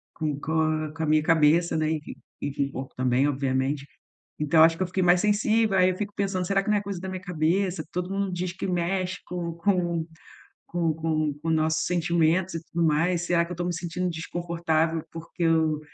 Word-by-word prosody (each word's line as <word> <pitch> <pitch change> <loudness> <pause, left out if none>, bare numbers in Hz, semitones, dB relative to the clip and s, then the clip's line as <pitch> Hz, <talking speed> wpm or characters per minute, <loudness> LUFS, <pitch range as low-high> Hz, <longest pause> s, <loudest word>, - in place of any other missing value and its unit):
com 150 -3 -2
com 160 +2 0
a 155 -1 -1
com 160 - -3
a - - +1
minha 155 0 +4
cabeça, 160 +1 +3
né, 155 0 +1
e 155 -1 -1 0.4
e 145 - -2
com 140 - 0
o 140 - -7
corpo 130 0 -7
também, 130 +2 +2
obviamente. 135 0 -1 0.5
Então 150 +2 +3
eu - - +10
acho 165 0 +4
que 185 - -2
eu - - +1
fiquei 185 +1 -1
mais 175 0 +5
sensível, 215 0 +2
aí 185 0 +5
eu 185 - -3
fico 205 +1 -4
pensando: 195 -2 -1
"Será 195 +1 +2
que 195 - -7
não 210 - +4
é - - -4
coisa 200 -2 -5
da 190 - -6
minha 185 -1 -5
cabeça? 180 0 0
Todo 180 +1 -3
mundo 195 -1 -1
diz 180 0 -2
que 190 - -5
mexe 185 +1 -1
com 175 -2 -4
com 170 -2 0 0.6
com 170 -2 0
com 155 -2 0
com 165 - -2
nossos 160 0 +1
sentimentos 170 +1 +1
e 165 - -4
tudo 170 +1 -1
mais.". 165 +3 +2
Será 170 -1 +2
que 170 - -11
eu - - -2
estou 175 0 -3
me 175 - -1
sentindo 175 +2 -2
desconfortável 165 -1 -1
porque 165 +1 -6
eu, 160 -2 +2
170 Hz, 220 wpm, -26 LUFS, 155-180 Hz, 0.6 s, eu